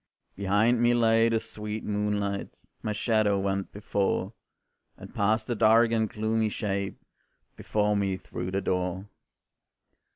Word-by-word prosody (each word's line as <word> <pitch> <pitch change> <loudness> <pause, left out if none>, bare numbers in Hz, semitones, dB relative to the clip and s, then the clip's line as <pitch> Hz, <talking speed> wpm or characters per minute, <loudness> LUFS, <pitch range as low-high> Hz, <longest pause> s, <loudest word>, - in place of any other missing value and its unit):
Behind 105 +5 +2
me 120 0 +4
lay 115 -1 +4
the 115 -1 +1
sweet 105 0 -6
moonlight, 105 -1 -1 0.3
My 110 - -2
shadow 105 -1 +1
went 95 0 -2
before, 100 0 -1 0.6
And - - -12
passed 110 +2 +1
a 120 - 0
dark 115 +1 +4
and 110 -2 +1
gloomy 110 +1 0
shape 100 -2 -3 0.6
Before 105 0 0
me 100 -2 0
through 90 -1 -6
the 95 +1 -1
door. 90 0 -2
105 Hz, 130 wpm, -27 LUFS, 100-110 Hz, 0.6 s, me